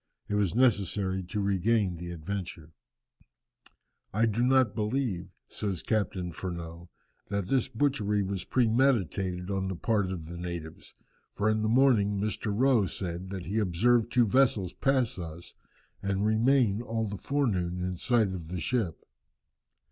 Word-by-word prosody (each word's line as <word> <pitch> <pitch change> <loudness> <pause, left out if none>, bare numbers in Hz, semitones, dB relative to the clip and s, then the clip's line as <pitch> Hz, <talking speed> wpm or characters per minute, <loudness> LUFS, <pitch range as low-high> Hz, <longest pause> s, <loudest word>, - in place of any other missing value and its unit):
It - - -4
was 105 -2 +1
necessary 100 -6 +2
to 105 +4 -4
regain 100 -1 +1
the 85 +1 -7
Adventure. 85 -1 -6 1.4
"I 110 +3 +2
do 115 +1 0
not 130 -3 +4
believe," 110 -4 -1 0.2
says 95 -5 -3
Captain 95 -5 -1
Furneaux, 85 0 -7 0.4
"that 100 -1 -1
this 130 -3 +2
butchery 110 -6 0
was 95 -2 -3
premeditated 100 - +1
on 95 -1 -1
the 95 - -3
part 105 0 0
of 90 -4 -5
the 85 +2 -8
natives, 85 -3 -7 0.4
for 105 +1 +1
in 110 0 0
the 110 - +1
morning 110 -5 +4
Mr. 105 +1 -2
Rowe 120 -2 +3
said 90 0 -5
that 95 -2 -5
he 105 +5 -1
observed 110 +5 +2
two 120 0 +4
vessels 110 -6 +2
pass 130 -7 +1
us, 85 0 -8 0.5
and 100 +1 0
remain 110 -1 +3
all 115 -1 -2
the 100 -1 -6
forenoon 95 -11 0
in 90 0 -2
sight 115 +2 +2
of 85 -4 -6
the 90 +2 -4
ship. 95 -4 -1
100 Hz, 150 wpm, -29 LUFS, 90-115 Hz, 1.4 s, not